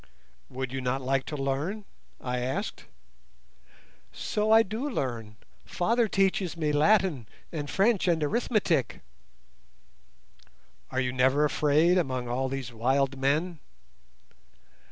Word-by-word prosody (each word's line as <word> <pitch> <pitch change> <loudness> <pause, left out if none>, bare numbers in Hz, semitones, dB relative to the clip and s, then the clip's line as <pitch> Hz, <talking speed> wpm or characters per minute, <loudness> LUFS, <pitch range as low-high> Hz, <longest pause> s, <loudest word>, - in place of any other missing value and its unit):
"Would 130 -1 -4
you 135 0 -3
not 130 +1 -1
like 135 +1 0
to 150 - -4
learn?" 145 +10 -2 0.3
I 125 -1 -3
asked. 125 +2 -3 1.3
"So 210 +1 -2
I 225 +1 +7
do 225 +8 -4
learn. 115 - -4 0.3
Father 230 +6 +1
teaches 190 -3 0
me 155 -2 0
Latin 155 - +2 0.2
and 145 -3 -4
French 200 -1 +2
and 165 -3 +2
arithmetic." 175 - +1
"And - - -18 1.9
are 130 - -2
you 125 -1 -1
never 130 +3 +3
afraid 155 +5 +3
among 130 -6 -2
all 130 +2 -1
these 130 -3 -5
wild 135 +4 +1
men?" 155 +5 0
145 Hz, 120 wpm, -28 LUFS, 130-185 Hz, 1.9 s, I